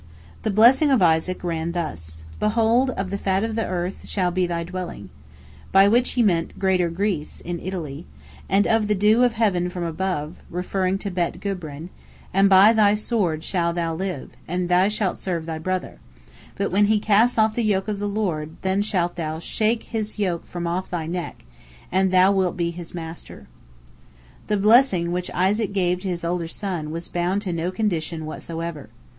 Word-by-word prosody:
The - - -1
blessing 240 +8 +5
of 260 -8 +4
Isaac 165 +2 +2
ran 170 -1 -2
thus: 80 - -5 0.2
"Behold, 230 +4 +2
of 195 -6 -3
the 200 - -2
fat 195 0 0
of 225 0 -2
the 225 0 -1
earth 180 +1 -4
shall 180 -3 0
be 180 0 +1
thy 170 -1 -2
dwelling," 175 - -7 0.6
by 195 +1 +6
which 240 +4 +2
he 245 - +2
meant 170 -6 0
Greater 185 -3 +2
Greece, 175 -3 -2
in 175 0 -5
Italy; 165 - -6 0.4
"and 195 +1 +3
of 225 -2 +2
the 210 - +2
dew 210 +4 +4
of 245 -2 +3
heaven 195 -6 +1
from 180 -1 -5
above," 165 -2 -3
referring 185 +2 -1
to 200 0 -5
Bet 175 -2 -2
Gubrin; 170 -5 -5 0.4
"and 195 +1 +4
by 195 +3 +7
thy 210 -2 +4
sword 200 -8 -1
shalt 170 -2 0
thou 165 -1 -1
live, 180 -4 -4 0.2
and 180 +1 -2
thou 180 +2 +4
shalt 210 -3 -1
serve 170 -4 -3
thy 160 -1 -4
brother," 185 +3 -3 0.6
but 200 - -2
when 205 +3 +4
he 215 +1 +3
casts 220 +4 +3
off 220 0 +3
the 240 - -1
yoke 200 -2 +1
of 210 -2 -2
the 205 0 -2
Lord, 165 -7 -2
then 190 +1 +1
shalt 180 -4 -1
thou 160 -2 -3
"shake 220 +7 0
his 215 -2 -4
yoke 180 -5 -2
from 175 -1 -5
off 175 +2 -2
thy 170 -3 -3
neck," 175 - -5 0.5
and 190 +1 +2
thou 185 +1 +5
wilt 190 -3 0
be 170 -1 0
his 170 0 -8
master. 165 -1 -8 1.0
The 210 - +1
blessing 205 -5 +4
which 180 0 -2
Isaac 200 +3 +1
gave 180 -2 +1
to 195 - -5
his 175 -2 -3
older 170 0 -1
son 175 -4 -4
was 165 +2 -5
bound 180 +4 -1
to 185 -4 -2
no 170 +1 -1
condition 170 -5 -2
whatsoever. 165 -2 -6
185 Hz, 185 wpm, -23 LUFS, 170-205 Hz, 1.0 s, by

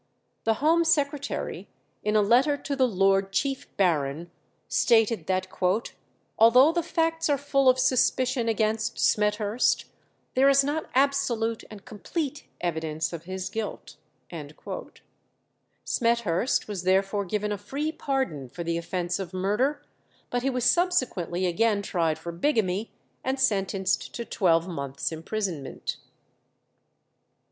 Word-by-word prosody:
The 225 0 +3
Home 325 +5 +3
Secretary, 290 -3 -1 0.4
in 210 0 0
a 210 - +5
letter 255 +7 +4
to 285 0 -4
the 260 -1 +3
Lord 195 -2 +2
Chief 270 +7 -1
Baron, 160 -3 0 0.4
stated 225 -6 +2
that 185 0 0 0.9
"although 250 +7 +7
the 345 +1 0
facts 325 -1 0
are 285 - +3
full 275 -1 +2
of 255 - +4
suspicion 255 -1 +2
against 220 0 0
Smethurst, 210 +2 +2 0.5
there 270 +2 +5
is 275 0 +5
not 295 +3 -2
absolute 260 -5 +1
and 210 -2 -12
complete 295 - -4 0.2
evidence 160 -1 -2
of 170 0 -7
his 185 0 -4
guilt." 220 0 -5 1.9
Smethurst 235 -2 +1
was 205 -4 -4
therefore 195 +2 +1
given 210 +3 -2
a 205 - -1
free 285 +10 -3
pardon 260 - -2
for 170 - -6
the 170 0 -1
offence 175 +1 -2
of 185 -1 -6
murder, 210 +10 0 0.5
but 245 - 0
he 270 - 0
was 250 -2 -1
subsequently 245 - +1
again 205 +3 +1
tried 165 -5 0
for 170 +2 -6
bigamy, 205 - 0 0.3
and 265 +1 -1
sentenced 195 -4 0
to 235 - -4
twelve 170 -5 +2
months' 140 -5 -4
imprisonment. 165 -3 -4
215 Hz, 125 wpm, -26 LUFS, 185-265 Hz, 1.9 s, although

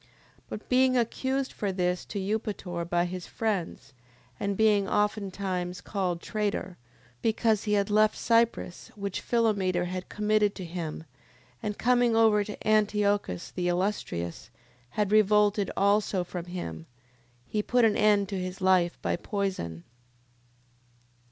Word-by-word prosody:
10:13. - - -29 0.4
But 215 - -7
being 255 0 +4
accused 260 +3 -1
for 200 -2 -2
this 180 -1 -1
to 210 - -6
Eupator 195 -4 -3
by 175 0 +2
his 180 0 -6
friends, 185 -11 -3 0.5
and 200 -1 -1
being 210 -3 +3
oftentimes 195 -3 -1
called 180 -4 -2
traitor, 205 -4 -2 0.4
because 220 -1 +1
he 210 - +1
had 200 0 +1
left 215 +1 +4
Cyprus, 230 -6 +1
which 200 -2 -4
Philometor 200 -7 +1
had 185 +1 -5
committed 210 -1 +1
to 185 - -6
him, 165 -2 -5 0.6
and 210 -1 -3
coming 245 -1 +3
over 220 -2 +4
to 210 +1 -8
Antiochus 205 - +1
the 180 -1 -2
Illustrious, 175 - -2 0.4
had 205 +5 -1
revolted 210 -1 +4
also 200 -1 +2
from 175 -1 -6
him, 85 - -6 0.6
he 210 - -1
put 245 +2 +3
an 215 - +3
end 205 -2 +3
to 195 -2 -3
his 185 +1 -5
life 185 -2 +3
by - - +1
poison. 185 - -3
200 Hz, 135 wpm, -28 LUFS, 180-215 Hz, 0.6 s, being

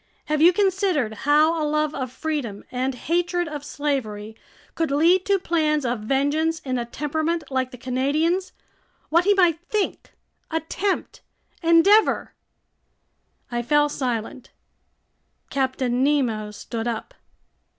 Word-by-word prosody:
Have 305 0 0
you 340 +3 +8
considered 375 - +1
how 305 +7 +3
a - - 0
love 305 0 0
of 255 -3 -4
freedom 265 -9 -4
and 255 +1 -1
hatred 350 +5 -1
of 295 -2 -6
slavery 220 -9 -3 0.4
could 325 -1 -1
lead 335 +6 +3
to 400 -1 +4
plans 310 -5 0
of 240 -1 -1
vengeance 285 +8 0
in 255 -2 -2
a 240 - -3
temperament 315 +5 -2
like 260 -1 0
the 250 - -11
Canadian's, 295 +9 0 0.6
what 335 +3 +3
he 410 0 +4
might 345 -4 +3
think, 420 -2 -2 0.4
attempt, 335 +5 -2 0.4
endeavor... 335 +6 +4 0.6
?" - - -43
I 240 0 -1
fell 295 +4 +3
silent. 250 -2 -3 1.0
Captain 260 -2 0
Nemo 245 -7 +1
stood 225 +2 -5
up. 235 - -4
295 Hz, 130 wpm, -23 LUFS, 255-335 Hz, 1.0 s, you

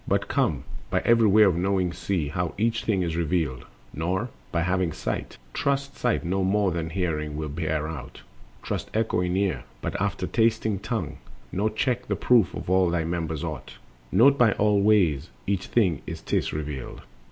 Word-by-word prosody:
But - - +1
come, - - 0 0.3
by - - 0
every 115 -1 +5
way 105 +2 +6
of 95 -5 +4
knowing 90 0 +1
see 90 -4 -2
How 90 +2 -2
each 115 +2 0
thing 100 -5 +1
is 85 -2 -2
revealed. 80 -5 -1 0.3
Nor, 95 - -1 0.2
having 90 0 0
sight, - - -4 0.2
Trust 140 -1 -1
sight 120 -7 0
no 95 +2 0
more 100 0 +2
than 80 -1 -2
hearing 80 -4 -2
will 75 -1 -3
bear 80 0 -2
out, 80 -4 -8 0.4
Trust - - -3
echoing 90 -5 +1
ear 100 -1 0 0.2
but - - -4
after - - -1
tasting 110 -3 +1
tongue; 100 - -3 0.3
Nor 105 +4 +1
check 125 +3 -1
the - - 0
proof 115 -8 +3
of - - -6
all 95 -1 +3
thy 85 -1 0
members 80 -2 -3
aught: - - -6 0.3
Note 140 +8 +5
by 115 -4 +5
all 105 -1 +2
ways 90 -8 +3 0.2
each 100 -1 -1
thing 95 - +2
as - - -5
'tis - - -1
revealed. 75 -4 -5
95 Hz, 175 wpm, -26 LUFS, 80-110 Hz, 0.4 s, way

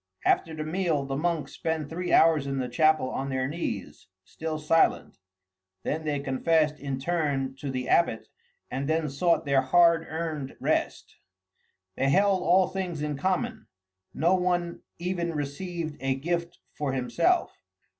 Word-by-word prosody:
After 160 -1 +2
the 155 - -3
meal 160 -3 0
the 135 0 -3
monks 155 -1 -1
spent 160 -2 -2
three 175 +3 -4
hours 160 -4 +5
in 135 0 -2
the 130 -1 -1
chapel, 155 +1 +2
on 135 +1 -3
their 130 -1 -1
knees, 145 - -5 0.2
still 160 +6 -4
silent; 155 +2 +1 0.6
then 155 +1 -2
they 145 -2 0
confessed 150 +3 +1
in 140 -2 -3
turn 140 -4 -1
to 140 +1 -5
the 130 -1 -3
abbot 170 -10 +2 0.4
and 140 +3 -2
then 160 -1 +1
sought 165 +5 +1
their 140 -1 +3
hard 165 +4 +4
earned 155 -4 -4
rest. - - -1 0.8
They 135 - +1
held 195 +4 +3
all 185 +1 +4
things 180 -5 -3
in 150 -1 -2
common; 215 - -2 0.4
no 170 +5 +2
one 175 -2 0 0.2
even 170 -1 -2
received 155 +2 -4
a 135 0 0
gift 170 +4 -3 0.2
for 145 -3 -2
himself. 235 - 0
155 Hz, 150 wpm, -27 LUFS, 140-175 Hz, 0.8 s, hours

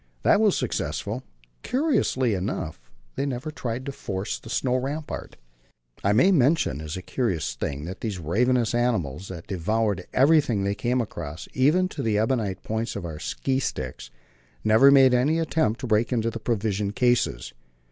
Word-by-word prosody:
That 205 - +5
was 210 -4 +3
successful; - - -2 0.4
curiously 240 - +1
enough, 90 - -3 0.3
they - - -2
never 135 +3 -4
tried 125 -3 -4
to 140 - -3
force 95 -7 -4
the - - -12
"snow 125 +2 0
rampart." 145 +4 -5 0.7
I 100 - +3
may 130 - +5
mention 140 - +2
as 80 +3 -5
a 95 - -7
curious 90 - -1
thing 70 +1 -4
that 90 +2 -7
these 105 -5 -3
ravenous 115 +9 +1
animals, 95 - 0
that 85 -3 -8
devoured 100 +1 -1
everything 135 -7 +3
they 100 +1 0
came 125 +4 0
across, 85 -7 -6
even 155 +8 +3
to 150 - -5
the 110 -4 +1
ebonite 110 -4 0
points 110 +1 -3
of 100 -4 -4
our 80 -2 -6
ski 130 - -1
sticks, 65 - -4 0.5
never 110 +6 +6
made 135 -2 +7
any 135 +6 +3
attempt 160 -8 0
to - - -3
break 115 +1 +1
into 115 -2 0
the 115 - -6
provision 105 -3 -1
cases. 120 - +1
115 Hz, 165 wpm, -25 LUFS, 95-130 Hz, 0.7 s, made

